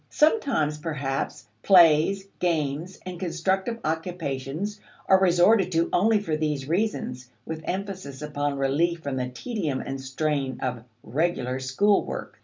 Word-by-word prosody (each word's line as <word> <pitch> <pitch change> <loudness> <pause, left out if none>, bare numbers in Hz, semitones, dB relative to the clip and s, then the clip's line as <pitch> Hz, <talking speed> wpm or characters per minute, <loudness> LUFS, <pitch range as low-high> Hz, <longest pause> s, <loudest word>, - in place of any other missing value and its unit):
Sometimes, 275 - +2
perhaps, 145 -4 -3 0.2
plays, 175 - +5
games, 165 0 -1
and 180 -2 -6
constructive 190 +5 -1
occupations 160 +3 -3 0.3
are 190 - +6
resorted 185 +2 +4
to 165 +1 +1
only 215 +4 +4
for 165 -7 -2
these 150 -3 -2
reasons, 160 - -2 0.2
with 160 -1 -5
emphasis 185 -8 -4
upon 145 -1 -2
relief 160 +5 +1
from 140 -2 -3
the 125 -1 -2
tedium 155 - -3
and 135 0 -5
strain 135 -1 -2
of 125 -2 -3 0.2
"regular" 130 -3 -1
school 195 +11 +2
work. - - -7
160 Hz, 130 wpm, -26 LUFS, 140-190 Hz, 0.3 s, are